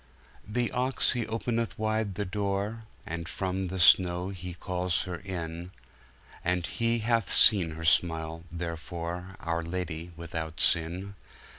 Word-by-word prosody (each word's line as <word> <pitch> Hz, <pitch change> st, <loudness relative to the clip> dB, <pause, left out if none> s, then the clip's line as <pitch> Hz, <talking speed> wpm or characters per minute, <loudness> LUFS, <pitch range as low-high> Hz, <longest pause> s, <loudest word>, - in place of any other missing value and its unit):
The 120 Hz, +3 st, 0 dB
Ox 130 Hz, +2 st, +1 dB
he 120 Hz, -3 st, -1 dB
openeth 115 Hz, -2 st, -2 dB
wide 110 Hz, -2 st, 0 dB
the 105 Hz, +1 st, -2 dB
Doore, 100 Hz, +3 st, -2 dB, 0.2 s
And 85 Hz, +1 st, -4 dB
from 95 Hz, -1 st, -2 dB
the 95 Hz, +1 st, -4 dB
Snowe 90 Hz, +1 st, +5 dB
he 90 Hz, -2 st, -6 dB
calls 90 Hz, -1 st, -1 dB
her 90 Hz, -3 st, -5 dB
inne, 85 Hz, -2 st, -5 dB, 0.7 s
And 90 Hz, 0 st, +1 dB
he 115 Hz, +4 st, 0 dB
hath 115 Hz, -3 st, +2 dB
seen 90 Hz, -8 st, +6 dB
her 80 Hz, +1 st, -6 dB
Smile 80 Hz, +1 st, +2 dB
therefor, 85 Hz, +2 st, -5 dB
Our 85 Hz, 0 st, -1 dB
Ladye 85 Hz, -1 st, -4 dB
without 80 Hz, -1 st, -5 dB
Sinne. 90 Hz, +4 st, +2 dB
90 Hz, 135 wpm, -29 LUFS, 85-100 Hz, 0.7 s, seen